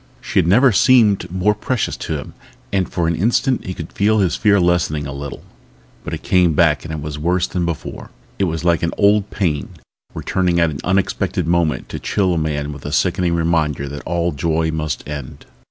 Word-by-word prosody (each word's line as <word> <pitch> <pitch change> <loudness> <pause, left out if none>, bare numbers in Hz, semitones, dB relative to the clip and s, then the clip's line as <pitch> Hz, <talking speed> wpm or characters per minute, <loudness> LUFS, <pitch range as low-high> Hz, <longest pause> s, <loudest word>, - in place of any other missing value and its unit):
She - - 0
had - - +2
never 125 +8 +5
seemed 105 -4 +4
more 95 +3 +2
precious 115 +3 -2
to - - -3
him - - -9 0.4
and 95 -2 +1
for 85 -2 0
an 85 - +1
instant 120 - +1
he 95 - -4
could 80 -1 -8
feel 110 +2 +2
his 95 -6 +2
fear 105 -2 +3
lessening 85 -4 +1
a 70 - -5
little. 70 0 -7 0.6
But - - -4
it - - -11
came 90 -3 +3
back 75 -1 +3
and 80 -2 -5
was 75 -1 -5
worse 90 +3 +1
than 90 -2 -2
before. 85 -3 -5 0.3
It 100 - +3
was 80 -1 -3
like 85 -2 +3
an 85 - -1
old 105 0 +3
pain 75 -8 -2 0.4
returning 90 -2 0
at 85 -1 +3
an 70 - -6
unexpected 95 -3 0
moment 85 -2 0
to - - -5
chill 95 -3 0
a - - -1
man 75 -1 -2
with 70 - -10
the 75 - -6
sickening 85 +1 +1
reminder 80 -4 0
that 75 +1 -7
all 85 +1 -1
joy 80 +2 0
must 75 -5 -3
end. 75 -3 -7
85 Hz, 200 wpm, -19 LUFS, 75-95 Hz, 0.6 s, never